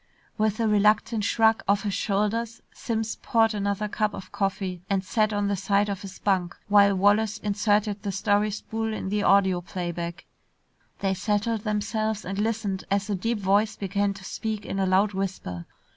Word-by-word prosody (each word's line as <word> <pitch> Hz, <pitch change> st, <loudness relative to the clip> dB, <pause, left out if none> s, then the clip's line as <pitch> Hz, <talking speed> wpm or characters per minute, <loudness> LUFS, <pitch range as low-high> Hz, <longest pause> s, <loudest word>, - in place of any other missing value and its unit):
With 215 Hz, 0 st, 0 dB
a 225 Hz, -, +2 dB
reluctant 210 Hz, +1 st, +3 dB
shrug 225 Hz, +1 st, +3 dB
of 200 Hz, +2 st, +2 dB
his 205 Hz, -2 st, -1 dB
shoulders, 215 Hz, +4 st, -1 dB
Simms 225 Hz, -1 st, -3 dB
poured 225 Hz, -1 st, +2 dB
another 200 Hz, 0 st, -1 dB
cup 210 Hz, 0 st, -1 dB
of -, -, -9 dB
coffee 190 Hz, -2 st, -2 dB
and 195 Hz, -1 st, +1 dB
sat 215 Hz, +2 st, +1 dB
on 205 Hz, -1 st, 0 dB
the 200 Hz, -, +1 dB
side 200 Hz, +1 st, +1 dB
of 200 Hz, 0 st, -3 dB
his 195 Hz, -2 st, -9 dB
bunk 185 Hz, -3 st, 0 dB
while 200 Hz, -1 st, +5 dB
Wallace 205 Hz, +3 st, +3 dB
inserted 205 Hz, 0 st, 0 dB
the 205 Hz, -, -3 dB
story 205 Hz, +2 st, +1 dB
spool 220 Hz, +1 st, -3 dB
in 190 Hz, -, -4 dB
the 210 Hz, +1 st, 0 dB
audio 190 Hz, -3 st, +4 dB
playback. 175 Hz, -1 st, -5 dB, 0.8 s
They 195 Hz, -1 st, +1 dB
settled 210 Hz, +3 st, 0 dB
themselves 215 Hz, 0 st, -1 dB
and 195 Hz, +2 st, -4 dB
listened 210 Hz, -3 st, -1 dB
as 200 Hz, +1 st, 0 dB
a -, -, +1 dB
deep 230 Hz, +5 st, -1 dB
voice 205 Hz, +2 st, +2 dB
began 200 Hz, 0 st, -1 dB
to 195 Hz, -, -11 dB
speak 220 Hz, 0 st, -4 dB
in 195 Hz, -, -3 dB
a 190 Hz, -, +1 dB
loud 195 Hz, +3 st, +3 dB
whisper. 185 Hz, -, -4 dB
205 Hz, 175 wpm, -26 LUFS, 195-215 Hz, 0.8 s, while